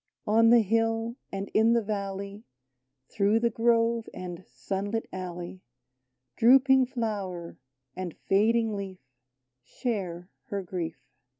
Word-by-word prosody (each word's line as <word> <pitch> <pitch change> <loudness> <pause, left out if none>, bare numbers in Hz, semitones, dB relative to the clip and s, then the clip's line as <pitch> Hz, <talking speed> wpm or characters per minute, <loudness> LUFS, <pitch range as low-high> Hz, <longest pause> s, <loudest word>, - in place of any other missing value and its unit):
On 225 +2 +5
the 235 0 +7
hill 225 +2 0 0.2
and 195 0 -4
in 225 +2 +5
the 235 -1 +2
valley, 200 0 -4 0.7
Through 205 +2 +2
the 235 0 +1
grove 230 0 +2
and 180 -1 -7
sun 195 +1 -4
lit 225 +1 -2
alley, 180 0 -6 0.8
Drooping 265 +2 +6
flower 200 -8 -4 0.4
and 185 -3 -5
fading 220 +2 +3
leaf 195 -2 -5 0.6
Share 180 - -4
her 200 -6 -4
grief. 175 -3 -4
210 Hz, 115 wpm, -28 LUFS, 185-230 Hz, 0.8 s, the